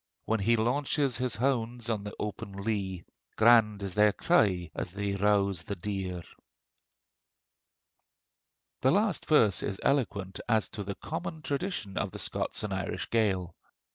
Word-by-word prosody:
When 110 0 +1
he 115 +4 +3
launches 135 +3 +1
his 125 -2 0
hounds 120 -2 -1
on 110 -3 -1
the 105 - -7
open 100 -1 -5
lea, 100 -3 -3 0.3
Grand 110 -3 +5
is 95 -2 -3
their 105 +1 +5
cry 95 - +2
as 90 - -4
they 100 0 -2
rouse 100 -3 +2
the 100 +5 -5
deer. 95 -2 -4 2.6
The 130 - +3
last 200 +1 +1
verse 115 - +4
is 100 -1 -3
eloquent 105 -9 0
as 110 -2 +2
to 105 - -5
the 100 0 -5
common 160 -1 -5
traditions 140 - -3
of - - 0
the - - -9
Scots - - -2
and 105 -2 -2
Irish 95 0 -3
Gael. 95 -6 +1
105 Hz, 145 wpm, -29 LUFS, 100-125 Hz, 2.6 s, Grand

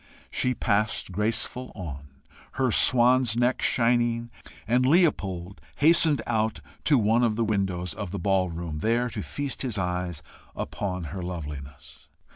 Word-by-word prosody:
She 125 0 0
passed 105 -2 0
graceful 115 +5 -2
on, 75 -8 -7 0.5
her 130 -2 +1
swan's 125 0 +5
neck 125 +1 +1
shining; 120 -1 +1 0.4
and 125 +2 +2
Leopold 100 - +1
hastened 160 -1 +4
out 110 0 -1 0.3
to 145 - +4
one 115 +2 +2
of 115 -3 +2
the 115 0 0
windows 95 -5 -1
of 100 -3 -6
the 100 - -5
ball 95 -2 +1
room, 85 -2 -5
there 120 +5 0
to - - -4
feast 145 -2 -4
his 125 -6 -2
eyes 90 -3 -3 0.3
upon 90 -3 -4
her 95 - -5
loveliness. 75 -4 -8
110 Hz, 140 wpm, -26 LUFS, 90-120 Hz, 0.5 s, swan's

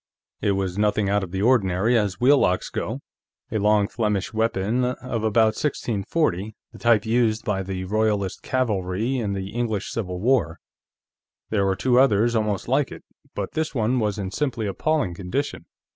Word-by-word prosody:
It 100 - +2
was 95 0 -2
nothing 105 -1 +2
out 100 -1 +2
of 95 - -5
the 95 +2 -2
ordinary, 110 -2 +3
as 105 -4 0
wheel 140 +3 +5
locks 90 0 +1
go; - - -3 0.5
a 110 - 0
long 105 0 +3
Flemish 105 -4 -1
weapon 110 +2 0
of 125 -2 -3
about 110 0 +3
1640, 110 - -1 0.2
the - - -13
type 115 -2 +3
used 115 -1 +1
by 100 -2 0
the 95 -1 -4
Royalist 105 -1 0
cavalry 110 -1 -1
in 105 -4 -2
the 95 0 -4
English 110 -4 -2
Civil 90 -5 -3
War. 110 -7 +1 0.9
There 100 -3 +2
were 95 - +1
two 125 +5 +3
others 120 -2 +3
almost 105 -3 -1
like - - +1
it, - - -10 0.3
but - - -3
this 160 -1 -2
one 120 +2 +1
was 105 -2 -1
in 95 -2 -4
simply 120 -2 -2
appalling 105 - 0
condition. 100 +11 -3
105 Hz, 170 wpm, -24 LUFS, 95-120 Hz, 0.9 s, wheel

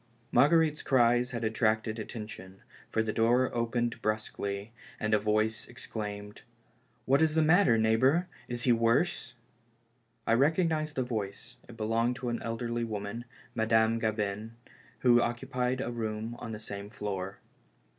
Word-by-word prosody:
M - - +4
ARGUERITE'S 155 +2 +4
cries 120 -1 +3
had 115 -2 -4
attracted 110 0 +1
attention, 105 -4 -8 0.3
for 110 - +1
the 110 -1 -2
door 120 +3 +3
opened 120 0 -1
brusquely, 105 -1 -3 0.3
and 110 0 0
a 105 - +5
voice 110 +1 0
ex 120 - -8
claimed: 105 -1 -6 0.3
" 120 0 -38
What 135 +3 +3
is 160 -1 +3
the 160 - +4
matter, 160 - +5
neighbor? 130 +10 +3 0.2
Is 120 -1 -4
he 125 - +4
worse?" 115 +7 +1 0.9
I - - +3
recognized 155 +3 +2
the 130 - +1
voice; 105 -5 -5
it 115 - -11
belonged 115 +2 +1
to 125 -1 -4
an 120 - -2
elderly 115 +1 -2
woman, 110 +1 -4 0.3
Madame 110 0 +2
Gabin, 110 0 -2 0.5
who 120 -1 +6
occupied 125 +1 -1
a 120 - -3
room 110 0 -3
on 115 - -6
the 105 - -5
same 100 -1 -7
floor. 100 -3 -5
115 Hz, 150 wpm, -30 LUFS, 110-125 Hz, 0.9 s, who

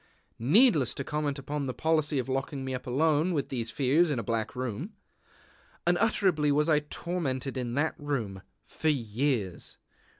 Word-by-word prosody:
Needless 155 - +4
to 140 - -3
comment 150 0 -2
upon 140 +1 -3
the 130 - -4
policy 155 -2 +1
of 130 - -1
locking 135 +1 -2
me 130 - -3
up 130 - -5
alone 155 +6 +2
with 140 - -1
these 115 -3 -3
fears 145 +7 +3
in 145 - 0
a 115 - -2
black 115 +2 -2
room. 130 - -4 0.9
Unutterably 175 -5 +2
was 150 +2 +2
I 155 -2 +4
tormented 150 -4 -3
in 125 -2 -3
that 155 +3 +1
room 120 -10 -3 0.2
for 160 - -1
years! 115 - -1
140 Hz, 160 wpm, -29 LUFS, 125-155 Hz, 0.9 s, Needless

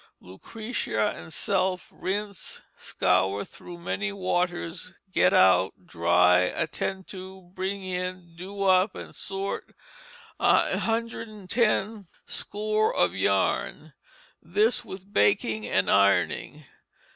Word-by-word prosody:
Lucretia 110 - -3
and 85 0 -10
self 185 -2 0
rinse, 200 0 -4
scour 95 +2 +1
through 175 - -11
many 200 +4 -3
waters, 180 -2 -2 0.2
get - - +4
out, 95 0 +4
dry, 90 +1 +4
attend 165 - -2
to, 190 -1 -10
bring 190 +1 -3
in, 180 -2 -5
do 195 +3 -6
up 185 +1 +4
and - - -8
sort 195 +1 -4 0.6
110 225 -2 0 0.2
score 215 +1 0
of - - +3
yarn; - - 0 0.5
this 425 +2 +1
with 195 +2 -10
baking 105 +1 +2
and 95 - +1
ironing. 95 -5 +2
185 Hz, 100 wpm, -26 LUFS, -, 0.6 s, get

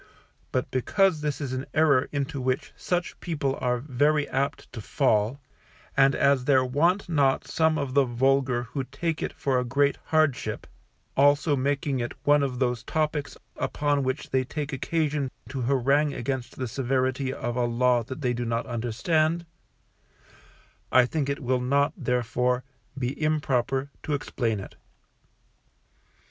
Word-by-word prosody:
But 130 - -1
because 170 - +2
this 150 -1 -2
is 140 -4 -3
an 130 +1 -4
error 145 -4 +4
into 140 -1 -2
which 130 0 -1
such 175 -1 -2
people 145 -5 -2
are 125 -1 +1
very 145 +3 +1
apt 140 +1 -2
to 115 - -6
fall; 115 +1 +1 0.6
and 135 0 +5
as 140 -2 +3
there 130 -2 +4
want 170 +10 +1
not 140 -5 +2
some 160 -1 +1
of 140 -3 -3
the 140 0 +5
vulgar 130 0 +1
who 120 +4 -4
take 150 +5 -3
it - - -2
for 130 -2 0
a - - 0
great 140 +3 +1
hardship, 145 -8 +1 0.5
also 145 +2 +4
making 140 0 0
it 120 0 -3
one 145 0 +4
of 135 -3 -1
those 125 -2 0
topics 155 -2 -2 0.2
upon 145 -1 0
which 130 +2 -3
they 130 0 +2
take 145 +2 -5
occasion 150 0 -1 0.2
to 130 0 -4
harangue 140 +3 +2
against 125 0 -3
the 130 - -2
severity 130 +2 0
of 120 -2 -4
a 125 -1 +1
Law 120 +1 +2
that 130 +6 -7
they 125 -3 +1
do 120 0 -3
not 115 0 -1
understand, 155 +8 0 1.5
I 130 -1 +6
think 140 +1 -2
it 140 +1 -3
will 125 0 +1
not, 140 +4 +2
therefore, 125 - 0 0.3
be 130 +3 -3
improper 140 -3 0
to 150 - -1
explain 115 -6 -2
it. 95 - -10
135 Hz, 155 wpm, -26 LUFS, 125-145 Hz, 1.5 s, I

